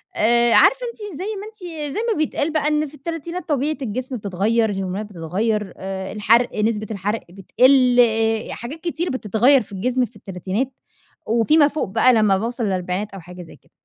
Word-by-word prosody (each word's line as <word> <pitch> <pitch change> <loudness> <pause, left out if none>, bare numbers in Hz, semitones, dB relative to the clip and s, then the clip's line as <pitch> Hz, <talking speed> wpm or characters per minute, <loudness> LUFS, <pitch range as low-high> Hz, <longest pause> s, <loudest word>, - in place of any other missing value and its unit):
آآ، 235 +2 +3
عارفة - - +5
أنتِ 420 -8 -8
زي 370 - -4
ما 400 +1 -7
أنتِ 340 -9 -7
زي - - -2
ما - - -5
بيتقال 305 0 -1
بقى 305 -1 +1
إن 300 0 +1
في 285 - -15
التلاتينات 335 +4 -6
طبيعة 295 +1 0
الجسم 255 +2 -3
بتتغيّر، 215 +3 0
الهرمونات 195 +1 -3
بتتغيّر، 205 +3 -2
آآ 190 0 -5
الحرق 225 +2 +2
نسبة 215 -1 0
الحرق 210 +2 -2
بتقل، 250 +7 +3
آآ، 225 -1 +2
حاجات 265 +7 -7
كتير 345 0 -2
بتتغيّر 250 +3 +3
في 210 - -13
الجسم 250 +6 0
في 235 - -17
التلاتينات، 195 +7 -4 0.6
وفي 230 +7 +3
ما 295 -2 +6
فوق 300 -5 -3
بقى 255 +6 +4
لمّا 215 -4 +3
باوصل 235 +2 -3
للأربعينات 185 +2 -2
أو 195 - -7
حاجة 180 +1 -11
زي 165 - -12
كده. - - -28
230 Hz, 180 wpm, -21 LUFS, 200-290 Hz, 0.6 s, ما